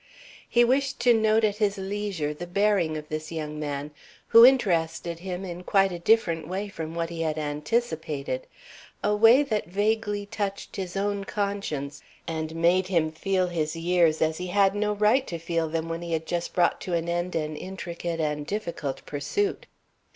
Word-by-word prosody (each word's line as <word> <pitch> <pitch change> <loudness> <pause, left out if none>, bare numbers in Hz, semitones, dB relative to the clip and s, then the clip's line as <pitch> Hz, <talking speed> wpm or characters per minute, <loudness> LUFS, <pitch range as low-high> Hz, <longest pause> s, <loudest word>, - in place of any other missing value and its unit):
He 240 - +5
wished 270 +3 +1
to 240 0 +6
note 220 0 +3
at 210 -1 +1
his 210 -2 +1
leisure 195 -6 -3
the 175 +4 -7
bearing 185 -4 +1
of 150 0 -8
this 155 +1 -4
young 150 -2 -4
man, 145 0 -4 0.4
who 230 - +9
interested 170 -9 +3
him 185 +1 -5
in 175 -1 -6
quite 195 0 +3
a 175 - -5
different 170 -5 +2
way 195 +4 -3
from 165 -4 -6
what 170 0 -2
he 165 -1 -4
had 160 -1 -1
anticipated, 150 - -2 0.6
a 210 0 +2
way 230 +6 +7
that 215 - -2
vaguely 205 +2 0
touched 200 -2 -4
his 190 -1 -4
own 200 0 -1
conscience 195 -9 -3 0.3
and 160 -1 -3
made 175 +3 +3
him 165 -4 +1
feel 185 +3 0
his 165 -3 -2
years 165 -1 +2
as 160 +1 0
he 180 - -4
had 195 +1 +3
no 210 0 0
right 215 +6 +3
to 170 - -4
feel 165 -1 -1
them 165 +1 -2
when 165 0 -4
he 170 -1 -4
had 160 0 -1
just 175 +1 -3
brought 175 -1 +2
to 180 - -2
an 165 0 -1
end 175 +1 -2
an 155 -1 -2
intricate 170 -1 -5
and 150 -1 -2
difficult 170 -9 -4
pursuit. 395 - -2
175 Hz, 180 wpm, -26 LUFS, 160-205 Hz, 0.6 s, who